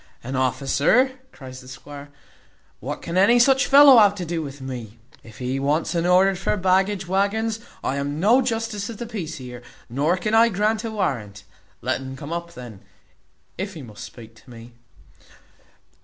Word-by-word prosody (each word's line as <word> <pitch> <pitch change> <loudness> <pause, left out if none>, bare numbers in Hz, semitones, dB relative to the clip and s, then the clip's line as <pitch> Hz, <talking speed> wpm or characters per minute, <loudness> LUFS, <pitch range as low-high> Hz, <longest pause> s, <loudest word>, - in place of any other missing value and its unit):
"An 130 +2 -5
officer!" 140 - +2 0.2
cries 130 -1 -11
the 125 - -15
squire; 140 +3 -11 0.7
"what - - -6
can 170 +2 -3
any 220 +6 +5
such 265 +2 +4
fellow 275 -3 +8
have 205 -2 +5
to 180 -3 -5
do 165 0 -3
with 140 -2 -8
me? 120 -4 -8 0.2
If 110 -2 -15
he 130 +1 -3
wants 150 +5 0
an 170 0 0
order 185 +2 +4
for 190 +3 -2
baggage 190 0 +1
waggons, 210 +4 0 0.2
I 135 - -1
am 145 +2 -3
no 225 +9 +4
justice 225 -4 -3
of 230 +1 -7
peace 165 -7 -5
here, 125 -2 -9 0.3
nor 150 +8 +1
can 215 +3 -3
I 230 +1 +6
grant 215 +2 0
a 225 - -3
warrant. 120 - -3 0.4
Let - - -1
un 135 0 -7
come 145 +3 -7
up 170 0 -6
then, 120 -6 -10 0.8
if 190 0 -4
he 155 - -8
must 110 -4 -11
speak 115 -2 -12
to 110 - -20
me." 120 0 -13
170 Hz, 175 wpm, -22 LUFS, 130-210 Hz, 0.8 s, fellow